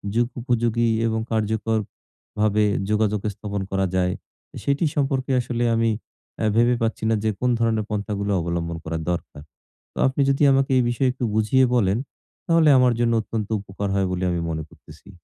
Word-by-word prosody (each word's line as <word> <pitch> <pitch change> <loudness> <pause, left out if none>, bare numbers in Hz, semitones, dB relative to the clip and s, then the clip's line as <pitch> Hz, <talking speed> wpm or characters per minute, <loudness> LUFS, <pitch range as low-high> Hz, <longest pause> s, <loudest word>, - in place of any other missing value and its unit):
যুগোপযোগী 120 -1 0 0.2
এবং 110 0 0
কার্যকরভাবে 110 -1 -1 0.3
যোগাযোগ 105 -1 +1
স্থাপন 100 0 -5
করা 95 0 +1
যায়, 90 0 +1 0.5
সেটি 140 +4 +1
সম্পর্কে 135 -2 0
আসলে 120 0 -2
আমি 115 0 +2 0.5
অ্যা 110 - 0
ভেবে 120 +2 +4
পাচ্ছি 115 -1 -1
না 110 - +3
যে 110 - +2
কোন 125 - +1
ধরনের 110 -2 +1
পন্থাগুলো 100 -1 -2
অবলম্বন 85 0 -3
করা 80 +1 -3
দরকার। 75 -4 -5 0.5
তো - - -18
আপনি 130 +2 0
যদি 135 +2 +2
আমাকে 135 0 +2
এই 125 - +4
বিষয়ে 125 +2 +1
একটু 125 0 -6
বুঝিয়ে 120 +5 +3
বলেন, 100 -4 +2 0.5
তাহলে 165 -2 +4
আমার 125 -1 +4
জন্য 120 -1 +2
অত্যন্ত 110 -1 -4
উপকার 100 +1 -5
হয় 95 -1 +1
বলে 90 0 -2
আমি 85 - -1
মনে 80 -1 -3
করতেছি। 80 +6 -17
110 Hz, 160 wpm, -23 LUFS, 100-120 Hz, 0.5 s, ভেবে